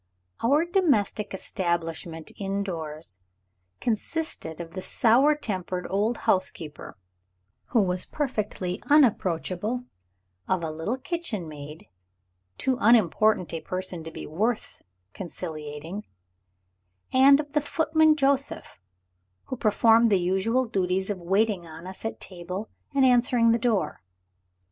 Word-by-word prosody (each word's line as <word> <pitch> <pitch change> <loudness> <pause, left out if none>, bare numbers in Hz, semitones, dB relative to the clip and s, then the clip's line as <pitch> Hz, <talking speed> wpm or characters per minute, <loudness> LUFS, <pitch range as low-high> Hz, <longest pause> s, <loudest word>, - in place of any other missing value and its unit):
Our 285 +7 +4
domestic 280 - +1
establishment 170 -4 -3
indoors 165 - -4 0.6
consisted 225 - -3
of 165 -1 -7
the 185 - -5
sour 255 +10 +4
tempered 185 -9 -3
old 210 +4 +1
housekeeper 165 - -1 0.7
(who 230 -5 +2
was 180 -1 -2
perfectly 210 -10 -3
unapproachable); 215 - +2 0.6
of 185 -2 0
a 160 - -2
little 160 +11 -3
kitchen 260 - -4
maid 150 +1 -9 0.7
(too 260 -1 0
unimportant 215 -4 +4
a 165 - -3
person 185 -2 -4
to 165 - -7
be - - -8
worth 215 +8 -2 0.3
conciliating); 160 +1 -6 1.1
and 275 +2 +7
of 295 -1 -5
the 300 - +3
footman 315 +1 +3
Joseph, 275 -1 0 0.6
who - - -5
performed 225 0 +4
the 200 - +5
usual 190 +8 +1
duties 190 -3 0
of 195 - -4
waiting 195 0 +1
on 160 +2 -10
us 185 0 -9
at 225 - -3
table, 185 +3 -6 0.2
and 270 -1 +5
answering 245 -2 +4
the 230 - +2
door. 225 - 0
200 Hz, 115 wpm, -26 LUFS, 175-245 Hz, 1.1 s, and